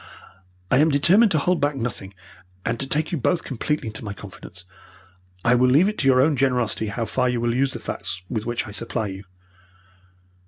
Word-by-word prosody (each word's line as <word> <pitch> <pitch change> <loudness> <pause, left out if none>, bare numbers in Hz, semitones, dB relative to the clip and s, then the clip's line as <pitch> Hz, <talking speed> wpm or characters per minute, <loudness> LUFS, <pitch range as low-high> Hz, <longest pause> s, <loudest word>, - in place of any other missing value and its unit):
"I - - +5
am 155 +2 +5
determined 175 +10 +5
to - - +3
hold 180 +4 +1
back 145 0 +1
nothing, 110 -6 -5 0.5
and 115 0 -1
to 135 - -2
take 155 +3 0
you 170 - -1
both 170 +6 +1
completely 135 -1 -2
into 110 +1 -8
my 100 -2 -5
confidence. 95 -3 -12 0.8
I 120 - +5
will 125 +1 +4
leave 150 +9 +5
it 215 - -3
to 135 - +1
your 130 -1 +5
own 150 +2 +3
generosity 125 -5 0
how 115 +3 -3
far 125 +3 0
you 125 -1 -1
will 120 0 0
use 130 +2 +1
the - - -4
facts 90 +1 -5
with 110 +1 -4
which 120 0 -2
I 105 - -8
supply 110 +1 -3
you." 95 0 -7
125 Hz, 205 wpm, -23 LUFS, 110-145 Hz, 0.8 s, I